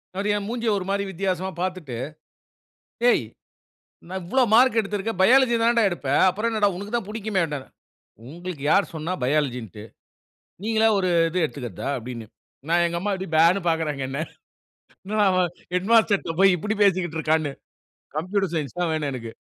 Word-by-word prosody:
அவரு 200 +2 -1
என் 205 -1 -3
மூஞ்சிய, 235 -1 -2
ஒரு 185 - -4
மாதிரி 200 0 0
வித்தியாசமா 190 0 -2
பார்த்துட்டு. 180 -9 -4 1.2
ஏய். 135 - +2 0.9
நா, 185 - -6
இவ்ளோ 260 +10 +2
மார்க் 245 +1 +5
எடுத்திருக்க. 205 +1 -3
பயாலஜி 245 +4 +5
தான்டா 235 0 +4
எடுப்ப. 160 -6 -5 0.2
அப்புறம் 215 +5 -1
என்னடா, 210 -2 +2
உனக்கு 200 +3 -7
தான் 230 -5 -2
புடிக்குமேன்னாறு. 190 -10 -2 0.6
உங்களுக்கு 170 -1 -7
யார் 200 - +3
சொன்னா 160 +3 -3
பயாலஜின்டு. 125 - -2 0.8
நீங்களா 225 0 +3
ஒரு, 185 -2 +1 0.2
இது 180 +2 -1
எடுத்துக்றதா? 125 - -5
அப்படின்னு. 120 -1 -7 0.4
நா, - - +3
எங்க 170 0 -2
அம்மா 205 +2 -1
அப்படி 190 0 -5
பேன்னு. 170 +4 +4
பாக்குறாங்க 155 -4 -1
என்ன. 135 +1 -4 0.9
என்னடா 210 +2 +1
அவன், 185 -1 +2 0.3
ஹெட்மாஸ்டர்ட்ட 200 -3 +2
போயி 195 -2 +6
இப்படி 210 +4 -2
பேசிக்கிட்டு 175 -5 +1
இருக்கான்னு. 155 -2 0 0.6
கம்ப்யூட்டர் 185 +2 -1
சயன்ஸ் 155 +2 -4
தான் 170 -2 0
வேணு 155 -2 -1
எனக்கு. 115 -3 -6
185 Hz, 150 wpm, -24 LUFS, 155-205 Hz, 1.2 s, போயி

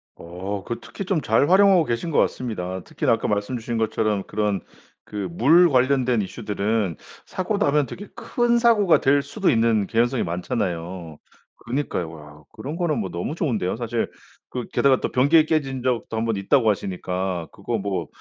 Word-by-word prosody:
어. 95 +4 -6
그 120 - -4
특히 195 - -7
좀 180 -5 0
잘 120 +7 +2
활용하고 190 -3 +6
계신 120 +8 -2
것 - - 0
같습니다. 95 -7 -2
특히나 - - 0
아까 - - -1
말씀 105 +4 -1
주신 115 0 -4
것처럼 110 -2 0
그런 105 -4 -1 0.4
그 100 -3 -4
물 160 - +5
관련된 130 -3 +2
이슈들은 100 -1 -2 0.3
사고 195 +3 -2
나면 145 -6 +2
되게 205 - -8
큰 240 -1 +1
사고가 215 -7 +4
될 140 +1 +4
수도 195 +5 -1
있는 115 -4 +2
개연성이 120 +3 +1
많잖아요. 85 -3 -3 0.5
그니까요. 120 - -2
와. 75 -1 -13
그런 145 +4 -6
거는 160 -8 0
뭐 95 -3 -3
너무 90 - -4
좋은데요. 115 - -1
사실 120 0 -2 0.4
그 125 -2 -4
게다가 135 -2 +3
또 - - -2
변기 150 +5 +5
깨진 135 -5 -1
적도 120 -3 -1
한번 115 -1 0
있다고 110 +3 +3
하시니까 90 -3 -2
그거 115 +3 -3
뭐 95 -4 -3
115 Hz, 345 characters per minute, -23 LUFS, 95-145 Hz, 0.5 s, 활용하고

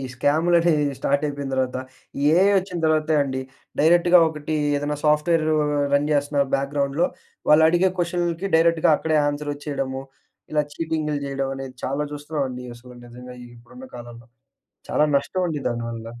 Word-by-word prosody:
స్క్యామ్‍లు 155 +7 +2
అనేవి 150 -4 +1
స్టార్ట్ 140 +2 0
అయిపోయిన 140 -1 -4
తర్వాత, 130 -1 -1 0.4
ఈ - - -1 0.2
ఏఐ 195 +2 +5
వచ్చిన 185 -2 -5
తర్వాతే 155 0 +2
అండి. 130 -1 -3 0.4
డైరెక్ట్‌గా 175 +3 +5
ఒకటి 155 0 -4 0.2
ఏదైనా 145 +1 -2
సాఫ్ట్‌వేరు 155 +1 +2 0.4
రన్ 145 +1 +2
చేస్తున్న 145 0 +1
బ్యాక్గ్రౌండ్‍లో, 140 +4 0 0.4
వాళ్ళు 155 +1 +7
అడిగే 180 +2 +3
క్వెషన్‌లకి 175 +1 -1
డైరెక్ట్‌గా 165 -1 +3
అక్కడే 155 -1 +1
ఆన్సర్ 145 0 -2
వచ్చేయడము, 135 -2 -4 0.5
ఇలా 150 -1 +2
చీటింగ్‌లు 155 -2 -2
చేయడం 135 -1 -3
అనేది 135 -1 -7
చాలా 140 +3 -1
చూస్తున్నామండి. 145 -4 -4
అసలు 125 +1 -14
నిజంగా 125 +1 -11 0.2
ఇప్పుడున్న 245 - -14
కాలంలో. 120 -1 -11 0.6
చాలా 150 - +3
నష్టం 180 +6 -2
అండి 150 -2 -3
దానివల్ల. 115 -1 -5
150 Hz, 140 wpm, -23 LUFS, 135-160 Hz, 0.6 s, వాళ్ళు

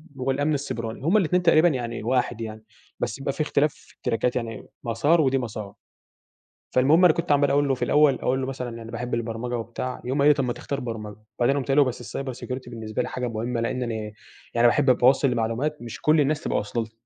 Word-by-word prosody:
والأمن 135 +3 0
السيبراني. 115 -5 -4
هم 180 +7 +4
الاتنين 180 -2 +2
تقريبًا 165 0 +6
يعني 120 -7 -2
واحد 120 -1 0
يعني 110 -1 -6 0.4
بس - - -3
يبقى 135 0 -2
في - - -3
اختلاف 150 0 +1
في - - -21
التراكات 115 +2 -1
يعني 115 -3 -4 0.2
مسار 145 +8 +2
ودي 135 -2 +2
مسار. 110 -5 -5 1.0
فالمهم 150 +8 +5
أنا 170 - +7
كنت 170 - -2
عمّال 145 -1 +4
أقول 145 +1 +3
له 135 - +2
في - - -2
الأول 150 -2 +4
أقول 130 +1 -1
له 130 - -2
مثلًا 130 -2 -4
أنا 115 0 -9
باحب 120 +1 -5
البرمجة، 115 +1 -2
وبتاع. 120 +2 -5
يقوم 130 +3 -1
قايل 140 +1 +6
لي: - - +8
"طب 140 -1 -1
ما 125 -1 -1
تختار 140 +3 -4
برمجة." 110 -5 -6 0.2
وبعدين 130 +4 +3
قُمت 135 - -3
قايل 135 0 +1
له: - - +8
"بس 130 -2 -5
الcyber 135 -1 -3
security 130 -1 -5
بالنسبة 110 -2 -4
لي - - -3
حاجة 125 -1 -3
مهمة 115 +1 -2
لإن 125 +2 -1
أنا 120 -2 -3 0.6
يعني 120 0 +5
باحب 135 +3 +3
أبقى 125 -1 +5
واصل 135 +1 +4
لمعلومات 120 +6 -1
مش 120 -1 -8
كل 155 0 +4
الناس 150 +2 +1
تبقى - - 0
واصله 105 +3 -2
لها." 110 - -12
125 Hz, 225 wpm, -25 LUFS, 115-140 Hz, 1.0 s, لي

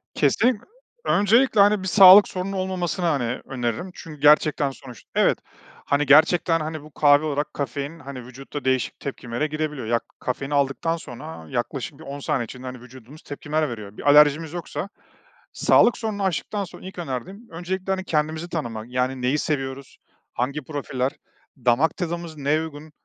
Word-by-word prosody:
Kesinlik 235 -3 +2 0.4
Öncelikle, 220 +2 +4
hani, 205 -1 +4
bir - - -3
sağlık 195 +1 +9
sorunun 185 +1 -4
olmamasını, 185 -2 -2
hani, 125 -7 0
öneririm 125 +7 -3
çünkü 155 -3 -11
gerçekten 150 -1 +4
sonuç 130 -4 -13
evet, - - +3 0.5
hani, 145 +1 +1
gerçekten, 165 +3 +5
hani, 155 -1 -4
bu 155 - -14
kahve 145 +1 +4
olarak 145 -1 -2
kafein, 145 +3 -4
hani, 130 -3 -8
vücutta 135 +3 -8
değişik 130 -1 0
tepkimelere 125 0 -3
girebiliyor. 150 -5 -4
Ya, 120 0 +2
ka - - -36
kafeini 135 +3 -3
aldıktan 140 +4 0
sonra 130 - -9
yaklaşık 135 +4 -4
bir - - -11
10 140 -1 -7
saniye 140 -4 -1
içinde, 130 +3 -10
hani, 125 -1 -8
vücudumuz 130 +4 -14
tepkimeler 150 +1 -2
veriyor. 105 -3 -8
Bir 145 - 0
alerjimiz 150 +2 +5
yoksa 175 +2 -5 0.6
sağlık 240 - +4
sorununu 215 -3 -3
aştıktan 195 +3 -1
sonra 185 - -11
ilk 190 - -9
önerdiğim 175 - -6
öncelikle, 185 +3 -4
hani, 190 0 -1
kendimizi 155 0 -1
tanımak, 115 -9 -4
yani, 125 +1 -1
neyi 130 +4 +1
seviyoruz, 135 -3 -3 0.4
hangi 140 +5 -2
profiller? 135 -2 -3 0.5
Damak 125 +5 +2
tadımız 170 -3 -4
neye 145 +3 +1
uygun? 155 -1 -8
150 Hz, 160 wpm, -23 LUFS, 130-170 Hz, 0.6 s, sağlık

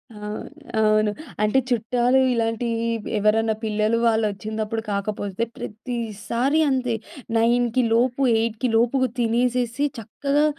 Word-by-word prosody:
ఆ! - - -11 0.6
అవును. 215 0 +3 0.3
అంటే 215 +5 +3
చుట్టాలు 245 +2 +2
ఇలాంటి 230 0 -1 0.5
ఎవరన్నా 220 +1 +2
పిల్లలు 215 +1 +1
వాళ్లొచ్చినపుడు 220 0 -1
కాకపోతే 200 +1 -2
ప్రతిసారి 235 +4 -2
అంతే 255 -3 0 0.4
9కి 240 +1 +2
లోపు, 245 +2 +2 0.2
8కి 230 +2 -1
లోపు 240 +4 +2 0.2
తినేసేసి, 245 +3 +1
చక్కగా 280 +7 0
230 Hz, 95 wpm, -23 LUFS, 215-245 Hz, 0.6 s, అవును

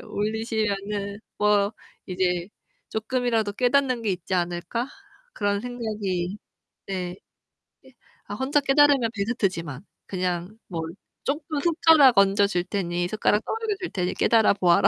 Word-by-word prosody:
올리시면은 210 -2 -2 0.2
뭐 205 0 +3 0.3
이제 180 -1 -1 0.4
'쪼끔이라도 225 -2 0
깨닫는 255 +1 +2
게 210 - 0
있지 185 +1 -3
않을까?' 175 +8 -2 0.4
그런 205 -1 0
생각이. 210 -6 -3 0.5
네. 180 -2 -3 0.7
이 265 0 -19 0.3
아 205 - -6
혼자 265 +5 +2
깨달으면 275 -3 +4
베스트지만. 195 - -2 0.2
그냥 180 +2 -3
뭐 170 -3 -4 0.4
쪼끔 295 +2 -2
숟가락 320 - +6
얹어 200 +1 +5
줄 180 -4 0
테니 175 -2 -2
숟가락 210 0 +1
떠 - - -4
막여 450 -2 -2
줄 370 - -4
테니 180 -1 -1
깨달아 225 -3 +4
보아라. 195 0 +4
205 Hz, 280 characters per minute, -25 LUFS, 185-245 Hz, 0.7 s, 숟가락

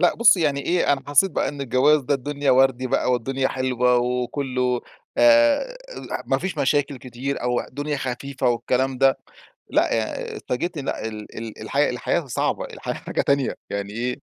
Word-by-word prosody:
لا - - +4
بُصي 230 -5 +5
يعني 145 -3 +1
إيه 170 0 +2
أنا 135 - -1
حسيت 145 +7 +4
بقى - - 0
إن 145 0 -6
الجواز 140 +4 +3
ده 140 +3 +1
الدنيا 140 +1 -1
وردي 130 0 +3
بقى، 125 - +1
والدنيا 130 +2 0
حلوة 125 -1 +1
وكله 125 0 -1 0.4
آآ، 295 +11 +4 0.2
لح - - -5
ما - - +1
فيش 185 -4 -4
مشاكل 140 0 +1
كتير 130 +2 -5
أو 125 0 +1
الدنيا 145 +2 -4
خفيفة 135 0 -2
والكلام 125 +2 0
ده. 135 0 +4 0.5
لأ، - - +2
يعني 110 -1 -3
اتفاجئت 170 +7 -3
لأ، 140 -5 -3
ال 105 -1 -9
ال 115 -1 -7
الحياة - - +1
الحياة - - -1
صعبة - - -1
الحياة - - -5
حاجة - - -3
تانية 140 -2 +1
يعني 100 0 -4
إيه؟ 125 +2 -2
135 Hz, 170 wpm, -23 LUFS, 125-145 Hz, 0.5 s, بُصي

